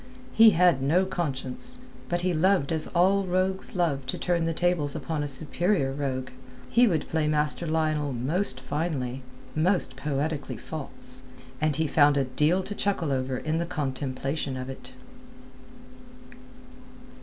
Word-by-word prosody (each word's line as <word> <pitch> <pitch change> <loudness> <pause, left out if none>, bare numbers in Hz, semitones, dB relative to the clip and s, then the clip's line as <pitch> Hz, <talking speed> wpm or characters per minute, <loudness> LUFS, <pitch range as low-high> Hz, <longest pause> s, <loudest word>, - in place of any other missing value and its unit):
He 225 0 +8
had 175 -6 +5
no 165 +8 +3
conscience, 170 - -3 0.3
but 175 0 0
he 180 0 +1
loved 175 -2 +2
as 160 -1 +2
all 190 +3 +3
rogues 185 +2 0
love 160 -7 +1
to - - -1
turn 170 -2 0
the - - +1
tables 165 -4 0
upon 160 -2 -3
a 145 - -2
superior 150 +2 0
rogue. 135 -2 -3 0.4
He 240 +1 +5
would 165 -7 0
play 160 -1 0
Master 150 +2 0
Lionel 155 -2 0
most 130 +4 -1
finely, 135 -2 -3 0.3
most 165 -4 +1
poetically 140 -2 -2
false; 130 -3 -7 0.4
and 155 -2 +2
he 160 +2 +1
found 145 -1 +4
a 140 - +3
deal 150 +8 +1
to 205 - -5
chuckle 195 -7 -1
over 130 -1 -1
in 160 +4 -1
the 170 - -2
contemplation 135 -2 -3
of 130 +1 -5
it. 135 - -10
155 Hz, 145 wpm, -27 LUFS, 135-175 Hz, 0.4 s, He